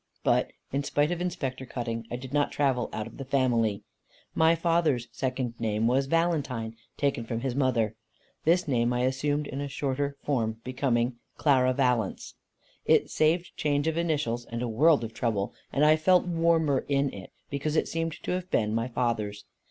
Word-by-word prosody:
But, -, -, +2 dB, 0.2 s
in 140 Hz, +1 st, -1 dB
spite 145 Hz, +3 st, +1 dB
of 175 Hz, 0 st, -2 dB
Inspector 140 Hz, -8 st, -3 dB
Cutting, 115 Hz, -2 st, -4 dB
I -, -, -3 dB
did 130 Hz, +2 st, -8 dB
not 145 Hz, -1 st, +2 dB
travel 135 Hz, -4 st, +1 dB
out 110 Hz, -, -3 dB
of -, -, -11 dB
the 135 Hz, -, -5 dB
family. 120 Hz, -6 st, +1 dB, 0.5 s
My 160 Hz, +1 st, +4 dB
father's 165 Hz, -7 st, +1 dB
second 130 Hz, -2 st, -2 dB
name 110 Hz, -1 st, 0 dB
was 130 Hz, +3 st, +2 dB
"Valentine," 140 Hz, -9 st, 0 dB, 0.2 s
taken 140 Hz, -4 st, 0 dB
from 115 Hz, 0 st, -3 dB
his 130 Hz, -1 st, -1 dB
mother. 120 Hz, -5 st, +1 dB, 0.5 s
This 175 Hz, +2 st, +3 dB
name 120 Hz, -3 st, +2 dB
I 125 Hz, -, 0 dB
assumed 145 Hz, +3 st, 0 dB
in 140 Hz, 0 st, -5 dB
a 145 Hz, -, -3 dB
shorter 140 Hz, 0 st, -2 dB
form, 115 Hz, -6 st, -1 dB
becoming 125 Hz, -2 st, 0 dB, 0.2 s
"Clara 130 Hz, -4 st, +4 dB
Valence;" 125 Hz, -6 st, 0 dB, 0.5 s
it -, -, +3 dB
saved 165 Hz, +3 st, +1 dB
change 145 Hz, 0 st, 0 dB
of 160 Hz, -, +1 dB
initials 145 Hz, -8 st, -1 dB
and 115 Hz, +1 st, -4 dB
a -, -, -1 dB
world 140 Hz, +6 st, +4 dB
of 115 Hz, 0 st, -5 dB
trouble, 110 Hz, -4 st, -1 dB, 0.2 s
and 145 Hz, +2 st, +3 dB
I 155 Hz, +1 st, +7 dB
felt 180 Hz, +4 st, +4 dB
warmer 165 Hz, -4 st, +2 dB
in 140 Hz, -1 st, +1 dB
it, 95 Hz, -2 st, -9 dB, 0.2 s
because 145 Hz, +2 st, -2 dB
it -, -, +2 dB
seemed 165 Hz, -1 st, -2 dB
to -, -, -2 dB
have 180 Hz, 0 st, -2 dB
been 105 Hz, -, +1 dB
my 115 Hz, +2 st, 0 dB
father's. 115 Hz, -4 st, -2 dB
135 Hz, 180 wpm, -28 LUFS, 120-150 Hz, 0.5 s, I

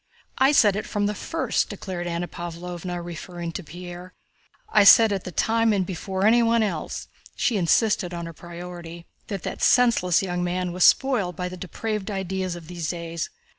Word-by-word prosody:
"I 265 Hz, +2 st, +5 dB
said 210 Hz, -7 st, +3 dB
from 205 Hz, -1 st, -1 dB
the 210 Hz, -, 0 dB
first," -, -, -1 dB
declared 175 Hz, -3 st, -5 dB
Anna 170 Hz, +1 st, -2 dB
Pávlovna 175 Hz, +1 st, -6 dB
referring 175 Hz, 0 st, -6 dB
to 185 Hz, -, -6 dB
Pierre, 175 Hz, +2 st, -10 dB, 0.5 s
"I 210 Hz, -, +5 dB
said 220 Hz, +1 st, +8 dB
at 195 Hz, -, -3 dB
the 180 Hz, -, -5 dB
time 225 Hz, +5 st, +2 dB
and 190 Hz, -2 st, +1 dB
before 190 Hz, +2 st, -3 dB
anyone 230 Hz, 0 st, +4 dB
else" 175 Hz, -7 st, -3 dB, 0.3 s
(she 245 Hz, -, +1 dB
insisted 195 Hz, 0 st, +2 dB
on 170 Hz, -1 st, -5 dB
her 165 Hz, -, -7 dB
priority) 170 Hz, 0 st, -9 dB, 0.2 s
"that 195 Hz, -4 st, -5 dB
that -, -, -5 dB
senseless 230 Hz, -8 st, +4 dB
young 180 Hz, -1 st, -2 dB
man 180 Hz, 0 st, -1 dB
was 180 Hz, +1 st, +3 dB
spoiled 225 Hz, -10 st, +3 dB
by 180 Hz, +2 st, -3 dB
the 185 Hz, -, -7 dB
depraved 210 Hz, +3 st, -4 dB
ideas 190 Hz, -2 st, -3 dB
of 170 Hz, -2 st, -10 dB
these 170 Hz, -3 st, -4 dB
days. 170 Hz, -2 st, -4 dB
180 Hz, 170 wpm, -24 LUFS, 175-205 Hz, 0.5 s, said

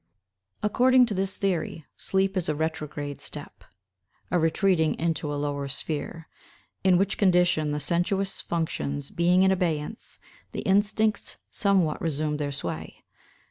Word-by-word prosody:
According 250 Hz, +4 st, +5 dB
to 225 Hz, -, -3 dB
this 190 Hz, 0 st, -1 dB
theory, 175 Hz, -5 st, -1 dB
sleep 195 Hz, 0 st, 0 dB
is 180 Hz, -4 st, 0 dB
a 150 Hz, -, +1 dB
retrograde 150 Hz, -2 st, -3 dB
step—a 95 Hz, -, -7 dB
retreating 165 Hz, 0 st, +2 dB
into 160 Hz, -2 st, -1 dB
a -, -, -2 dB
lower 145 Hz, -1 st, -2 dB
sphere; 155 Hz, +4 st, -4 dB, 0.6 s
in 185 Hz, -2 st, +5 dB
which 195 Hz, +2 st, 0 dB
condition, 175 Hz, -5 st, +3 dB
the 150 Hz, -, -1 dB
sensuous 175 Hz, +6 st, 0 dB
functions 145 Hz, -4 st, -3 dB
being 180 Hz, +2 st, +3 dB
in 190 Hz, -, +5 dB
abeyance, 175 Hz, +1 st, -2 dB, 0.4 s
the -, -, -3 dB
instincts 210 Hz, +2 st, +1 dB
somewhat 190 Hz, -7 st, +2 dB
resume 150 Hz, -1 st, -1 dB
their 145 Hz, -1 st, -2 dB
sway. 80 Hz, -, -5 dB
165 Hz, 130 wpm, -26 LUFS, 150-190 Hz, 0.6 s, According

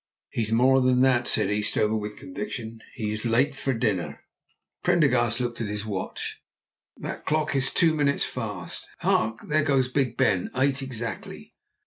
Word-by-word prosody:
"He -, -, -1 dB
is 110 Hz, 0 st, -2 dB
more 130 Hz, +3 st, +5 dB
than 125 Hz, 0 st, +3 dB
that," 130 Hz, -2 st, +3 dB
said 100 Hz, -, +2 dB
Eastover 105 Hz, +1 st, +1 dB
with 105 Hz, -1 st, -4 dB
conviction; 125 Hz, -, -6 dB
"he 110 Hz, -5 st, -2 dB
is 110 Hz, 0 st, -3 dB
late 120 Hz, +5 st, +2 dB
for 135 Hz, 0 st, -2 dB
dinner!" 110 Hz, -7 st, -1 dB, 0.6 s
Prendergast -, -, +3 dB
looked 120 Hz, -1 st, -3 dB
at 110 Hz, -, -1 dB
his 105 Hz, +1 st, -4 dB
watch. 100 Hz, -4 st, -4 dB, 0.6 s
"That -, -, -6 dB
clock 155 Hz, -2 st, +1 dB
is 135 Hz, 0 st, +2 dB
two 165 Hz, -2 st, +4 dB
minutes 145 Hz, -2 st, +2 dB
fast. 105 Hz, -8 st, -5 dB
Hark, 110 Hz, 0 st, +1 dB
there 155 Hz, +1 st, +3 dB
goes 135 Hz, -4 st, +2 dB
Big 135 Hz, -2 st, 0 dB
Ben! 90 Hz, -2 st, +2 dB
Eight 135 Hz, +1 st, +2 dB
exactly." 120 Hz, -4 st, -6 dB
120 Hz, 160 wpm, -26 LUFS, 110-135 Hz, 0.6 s, more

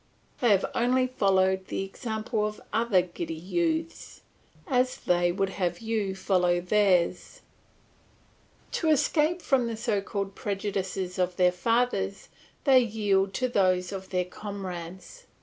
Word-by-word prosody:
They 240 Hz, -, +3 dB
have 200 Hz, -2 st, +4 dB
only 255 Hz, +2 st, +2 dB
followed 190 Hz, -6 st, +1 dB
the -, -, -2 dB
example 220 Hz, +1 st, -3 dB
of 210 Hz, 0 st, -7 dB
other 225 Hz, -6 st, +3 dB
giddy 170 Hz, -2 st, -6 dB
youths, 320 Hz, -, -2 dB, 0.4 s
as 255 Hz, -5 st, +1 dB
they 175 Hz, 0 st, +1 dB
would 195 Hz, +2 st, -1 dB
have 180 Hz, -3 st, -2 dB
you 220 Hz, -3 st, -2 dB
follow 180 Hz, -2 st, +2 dB
theirs. 180 Hz, -2 st, +1 dB, 1.3 s
To 325 Hz, -, 0 dB
escape 315 Hz, +3 st, +2 dB
from 255 Hz, -3 st, +2 dB
the 230 Hz, -1 st, -4 dB
so 215 Hz, -3 st, 0 dB
called 200 Hz, 0 st, -4 dB
prejudices 195 Hz, -2 st, -3 dB
of 180 Hz, 0 st, 0 dB
their 180 Hz, 0 st, +4 dB
fathers, 200 Hz, 0 st, 0 dB, 0.3 s
they 265 Hz, -2 st, +6 dB
yield 205 Hz, -4 st, +1 dB
to 255 Hz, -, +1 dB
those 185 Hz, -5 st, +1 dB
of 190 Hz, -1 st, -7 dB
their 180 Hz, -1 st, 0 dB
comrades. 190 Hz, -, -8 dB
200 Hz, 130 wpm, -27 LUFS, 185-235 Hz, 1.3 s, they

